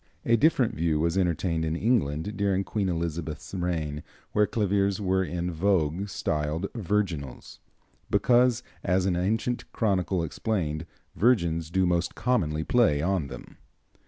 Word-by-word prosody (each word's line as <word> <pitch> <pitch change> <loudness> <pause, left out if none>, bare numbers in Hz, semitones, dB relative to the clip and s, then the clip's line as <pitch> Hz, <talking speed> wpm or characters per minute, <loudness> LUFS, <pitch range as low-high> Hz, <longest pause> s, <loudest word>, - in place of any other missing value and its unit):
A 115 - +4
different 130 -2 +3
view 80 -1 0
was 85 +2 +1
entertained 85 -2 0
in 80 0 -1
England 95 - 0
during 100 -1 +1
Queen 100 -1 -1
Elizabeth's 80 -2 -4
reign, 80 -5 -2 0.3
where 105 0 +3
claviers 100 -2 +1
were 95 -1 +1
in 90 0 -3
vogue 90 +1 0
styled 75 +1 -2
virginals, 95 - -3 0.5
because, 120 -1 +3 0.2
as 90 +1 +1
an 95 -2 +1
ancient 110 +7 -1
chronicle 95 -5 0
explained, 80 -3 -2 0.3
"virgins 85 -9 +2
do 95 +2 +2
most 85 -1 0
commonly 80 -12 0
play 95 -9 +3
on 90 -5 0
them." - - -11
90 Hz, 130 wpm, -27 LUFS, 80-105 Hz, 0.5 s, A